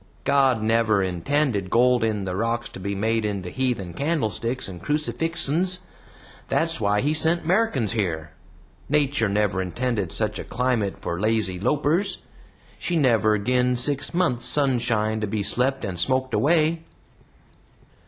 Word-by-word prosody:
"God 135 -5 +3
never 110 -2 +2
intended 100 - -1
gold 125 +2 +3
in 110 -3 0
the 90 -1 -3
rocks 115 +3 -1
to - - -10
be 100 +2 -3
made 110 +2 0
into 100 -4 -3
heathen 120 -9 -2
candlesticks 130 - -2
and 90 -3 -9
crucifixens. 165 +3 0 0.7
That's 165 -6 0
why 105 0 +2
he 145 +3 +1
sent 160 +2 +2
'Merrikans 175 - +1
here. 85 -8 -2 0.6
Nater 140 -6 +2
never 100 -2 +1
intended 100 -1 -2
such 105 -2 -2
a - - -4
climate 120 -5 -1
for 85 - -3
lazy 110 -4 0
lopers. 150 - 0 0.6
She 175 - -1
never 110 -7 +3
gin 125 +4 +1
six 140 +3 -1
months' 170 -9 0
sunshine 120 -6 +1
to 105 - -1
be 105 0 -2
slept 135 +6 0
and 90 -3 -4
smoked 130 +4 +1
away." 155 +8 +2
120 Hz, 140 wpm, -24 LUFS, 105-145 Hz, 0.7 s, God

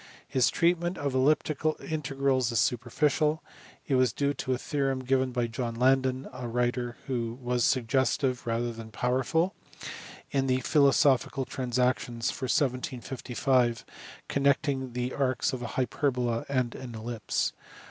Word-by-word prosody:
His 130 -1 +3
treatment 175 +1 +1
of 140 -2 -2
elliptic 145 +2 +2 0.2
integrals 135 -4 0
is 115 - +1
superficial; 145 +7 +1 0.4
it 145 - -1
was 130 -1 +4
due 140 0 0
to 130 -1 -4
a - - 0
theorem 135 -1 -1
given 130 0 +1
by 120 -1 0
John 115 0 -3
Landeri 130 +1 +2
a 125 - -5
writer 120 0 -1
who 120 -3 -2
was 125 -1 0
suggestive 130 +1 +1
rather 115 +1 -1
than 115 -1 -9
powerful 130 - 0 0.8
in 135 -1 +1
the 130 0 +2
Philosophical 135 -1 +3
Transactions 125 -2 0
for 130 - -5
1755 125 -1 0 0.4
connecting 140 -2 +1
the 125 +1 -2
arcs 130 -1 0
of 130 - -4
a 120 - -3
hyperbola 125 -3 0
and 130 -3 0
an 125 -3 -8
ellipse. 115 +1 -2
130 Hz, 135 wpm, -28 LUFS, 120-135 Hz, 0.8 s, was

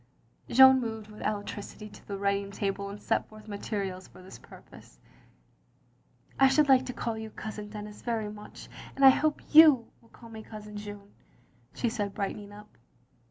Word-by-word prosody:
" - - -33
Jeanne 265 +1 +7
moved 220 -2 -5
with 210 - -12
alacrity 210 0 -5
to 210 - -16
the 200 - -4
writing 200 0 -1
table 200 0 -3
and 200 +1 -8
set - - -1
forth 215 0 -14
materials 200 -3 -4
for 185 - -16
this 190 - -12
purpose. - - -16 1.4
"I 270 - +7
should 285 +2 +3
like 260 -1 +4
to 250 - -4
call 230 -2 -4
you 220 0 -7
Cousin 210 -1 -8
Denis 210 0 -9
very 225 -3 -2
much, 210 0 -11 0.3
and 275 - +4
I 265 - +11
hope 305 +3 0
you 300 -7 +7
will 230 - -24
call 230 0 -15
me 220 -1 -8
Cousin 210 -1 -10
Jeanne, 205 -1 -9 0.3
" - - -35
she 245 - -1
said 210 -4 -3
brightening 205 0 -4
up. 210 - -15
210 Hz, 180 wpm, -28 LUFS, 205-235 Hz, 1.4 s, I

